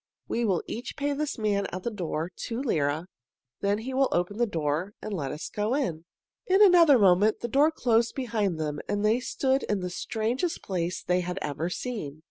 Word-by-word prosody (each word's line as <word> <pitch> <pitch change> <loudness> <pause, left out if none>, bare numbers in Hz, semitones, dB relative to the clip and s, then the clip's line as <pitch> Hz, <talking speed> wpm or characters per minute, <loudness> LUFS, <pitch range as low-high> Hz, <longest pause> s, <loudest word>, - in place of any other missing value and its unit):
We 235 - 0
will 190 -5 +1
each 240 +3 -6
pay 285 +1 0
this 295 0 -2
man 205 -2 0
at 185 0 -6
the 235 - -2
door 170 -4 -3
two 230 0 -4
lire, 155 - 0 0.5
then 200 +1 +1
he 250 +5 -5
will 265 0 +3
open 180 +5 -1
the 240 - +3
door 165 +2 -2
and 215 - -6
let 140 -8 -2
us 150 - -5
go 215 +4 -1
in." 170 - -2 0.4
In 380 +1 +4
another 345 -8 +7
moment 200 +1 +4
the 235 - -2
door 280 +6 +4
closed 235 -6 +1
behind 215 - -1
them, 150 -2 -2
and 205 +1 0
they 220 +3 +3
stood 265 +1 0
in 205 -2 -1
the 180 0 -3
strangest 235 - -2
place 180 -2 -2
they 180 0 +1
had 180 +1 -3
ever 150 +4 -2
seen. 180 - -5
210 Hz, 200 wpm, -27 LUFS, 175-250 Hz, 0.5 s, another